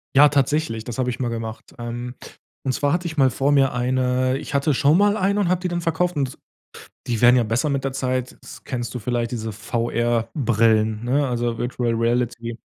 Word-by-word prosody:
Ja, 145 Hz, +2 st, +8 dB
tatsächlich. 140 Hz, -4 st, 0 dB
Das 120 Hz, -1 st, -6 dB
habe 125 Hz, -1 st, +1 dB
ich 125 Hz, -, -6 dB
mal 125 Hz, -, 0 dB
gemacht. 115 Hz, -1 st, -6 dB
Ähm, 120 Hz, +1 st, -5 dB, 0.5 s
und 135 Hz, -, -1 dB
zwar 145 Hz, +2 st, 0 dB
hatte 175 Hz, +1 st, -1 dB
ich 160 Hz, -, -5 dB
mal 135 Hz, -3 st, +4 dB
vor 140 Hz, +3 st, +1 dB
mir 135 Hz, -2 st, +4 dB
eine 130 Hz, +1 st, +1 dB
ich -, -, -8 dB
hatte 140 Hz, +1 st, +2 dB
schon 145 Hz, +6 st, +4 dB
mal 205 Hz, +1 st, +3 dB
eine 200 Hz, 0 st, +1 dB
und 190 Hz, -, +1 dB
habe 180 Hz, 0 st, +1 dB
die 180 Hz, -, -2 dB
dann 175 Hz, 0 st, -2 dB
verkauft 170 Hz, +1 st, 0 dB
und 135 Hz, -3 st, 0 dB
z -, -, -19 dB, 0.7 s
die 115 Hz, -3 st, -1 dB
werden 125 Hz, +1 st, +7 dB
ja 120 Hz, -, +3 dB
besser 115 Hz, +7 st, 0 dB
mit 140 Hz, -1 st, -1 dB
der 135 Hz, -, -1 dB
Zeit. 130 Hz, -1 st, -2 dB, 0.3 s
Kennst 120 Hz, -3 st, -4 dB
du 125 Hz, -, -4 dB
vielleicht 120 Hz, 0 st, -2 dB
diese 110 Hz, -2 st, -4 dB
VR-Brillen, 115 Hz, 0 st, 0 dB
ne? 135 Hz, +3 st, +1 dB
Also 120 Hz, -1 st, -1 dB
Virtual 120 Hz, -1 st, -1 dB
Reality. 115 Hz, 0 st, -1 dB
125 Hz, 205 wpm, -22 LUFS, 115-140 Hz, 0.7 s, Ja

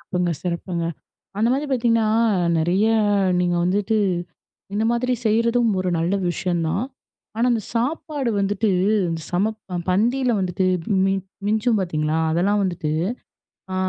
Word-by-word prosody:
சிறப்புங்க, 180 Hz, -2 st, -1 dB
சிறப்புங்க. 170 Hz, -1 st, -3 dB, 0.5 s
அந்த 220 Hz, +2 st, +3 dB
மாரி 280 Hz, +3 st, -1 dB
பார்த்தீங்கன்னா, 230 Hz, -3 st, +2 dB, 0.5 s
நெறைய 180 Hz, +6 st, +2 dB, 0.5 s
நீங்க 175 Hz, -1 st, +1 dB
வந்துட்டு 205 Hz, +4 st, +1 dB, 0.8 s
இந்த 215 Hz, +2 st, 0 dB
மாதிரி 250 Hz, +2 st, 0 dB
செய்றதும் 230 Hz, +2 st, +2 dB
ஒரு 185 Hz, -, -1 dB
நல்ல 170 Hz, +4 st, 0 dB, 0.2 s
விஷயம் 175 Hz, -1 st, -1 dB
தான். 195 Hz, +8 st, -1 dB, 0.5 s
ஆனா, 230 Hz, -, +1 dB
அந்தச் 225 Hz, -4 st, -1 dB
சாப்பாடு 275 Hz, +1 st, -1 dB
வந்துட்டு 205 Hz, +2 st, 0 dB, 0.4 s
அந்தச் 165 Hz, -2 st, -5 dB
சமப்ப 210 Hz, +5 st, 0 dB
ப 180 Hz, -, -1 dB
பந்தி 230 Hz, +8 st, +2 dB
ல -, -, +3 dB
வந்துட்டு 185 Hz, 0 st, 0 dB, 0.4 s
மிஞ் 195 Hz, 0 st, +1 dB, 0.3 s
மிஞ்சும், 220 Hz, +2 st, +2 dB
பாத்தீங்களா? 155 Hz, -3 st, -1 dB
அதெல்லாம் 195 Hz, +6 st, +2 dB
வந்துட்டு, 175 Hz, -5 st, -2 dB, 0.8 s
அ -, -, -2 dB
200 Hz, 135 wpm, -22 LUFS, 175-230 Hz, 0.8 s, அந்த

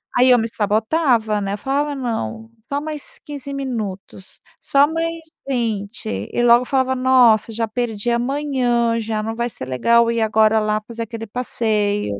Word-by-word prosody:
Aí 255 Hz, +1 st, +5 dB
eu 250 Hz, -, +7 dB
me 225 Hz, 0 st, 0 dB
sabotava, 220 Hz, +1 st, +1 dB
né? 195 Hz, 0 st, -2 dB
Eu -, -, -3 dB
falava: 285 Hz, +5 st, -1 dB
"Não, 225 Hz, -, -4 dB, 0.2 s
só 285 Hz, -, 0 dB
mais 305 Hz, -2 st, -6 dB
15 280 Hz, -1 st, -7 dB
minutos, 215 Hz, -8 st, -6 dB, 0.2 s
só 280 Hz, +1 st, +3 dB
mais 330 Hz, 0 st, -2 dB, 0.3 s
20". 220 Hz, -, -3 dB, 0.2 s
E 240 Hz, -, 0 dB
logo 240 Hz, +1 st, +5 dB
falava: 260 Hz, 0 st, +1 dB
"Nossa, 250 Hz, -4 st, +4 dB
já 225 Hz, 0 st, -2 dB
perdi 225 Hz, 0 st, -2 dB
a 235 Hz, -, +1 dB
manhã, 245 Hz, -4 st, 0 dB
já 215 Hz, -1 st, -3 dB
não 225 Hz, +1 st, -4 dB
vai 235 Hz, +1 st, -2 dB
ser 130 Hz, -, -6 dB
legal 235 Hz, -, +3 dB
ir 230 Hz, -1 st, -1 dB
agora 220 Hz, 0 st, +3 dB
lá 215 Hz, 0 st, 0 dB
fazer 230 Hz, -1 st, -5 dB
aquele 225 Hz, 0 st, -7 dB
passeio". 210 Hz, -, -1 dB
235 Hz, 165 wpm, -20 LUFS, 215-260 Hz, 0.3 s, eu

